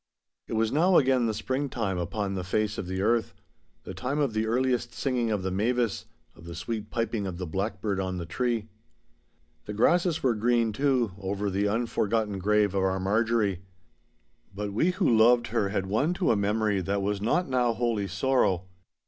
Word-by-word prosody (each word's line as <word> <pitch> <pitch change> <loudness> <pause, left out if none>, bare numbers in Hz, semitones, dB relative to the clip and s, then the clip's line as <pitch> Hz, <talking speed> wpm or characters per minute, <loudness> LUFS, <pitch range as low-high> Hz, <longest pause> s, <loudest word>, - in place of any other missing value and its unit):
It - - -6
was 110 0 +1
now 175 +6 +4
again 130 -3 +3
the 110 - 0
springtime 120 -5 -2
upon 100 +3 -2
the 95 -1 -3
face 105 +3 -1
of 90 - -5
the 95 +1 -2
earth—the 115 +2 -3
time 135 +3 -3
of 140 -6 +1
the 110 0 0
earliest 125 0 0
singing 125 -4 0
of 105 -3 -1
the 95 - -2
mavis, 115 +3 0 0.3
of 85 - -15
the 85 0 -8
sweet 105 +5 -4
piping 115 -3 -2
of 90 -2 -5
the 90 - -4
blackbird 100 +3 -2
on 95 -1 -2
the 85 - -4
tree. 115 +4 -1 1.0
The 105 - -5
grasses 170 - +2
were 130 -3 +3
green, 115 0 +1
too, 130 -3 +1
over 100 +1 -2
the 100 +2 +1
unforgotten 110 -2 0
grave 105 +1 +2
of 100 - +1
our 95 0 +1
Marjorie. 105 -1 +1 0.9
But 100 0 -4
we 155 - +2
who 185 +1 0
loved 120 +2 +4
her 105 -3 0
had 95 -2 -1
won 135 - 0
to 175 - +1
a - - +3
memory 105 0 +1
that 100 +2 -1
was 100 0 -1
not 175 - +1
now 125 -3 +2
wholly 115 -3 -1
sorrow. 100 -3 +1
110 Hz, 180 wpm, -27 LUFS, 100-120 Hz, 1.0 s, now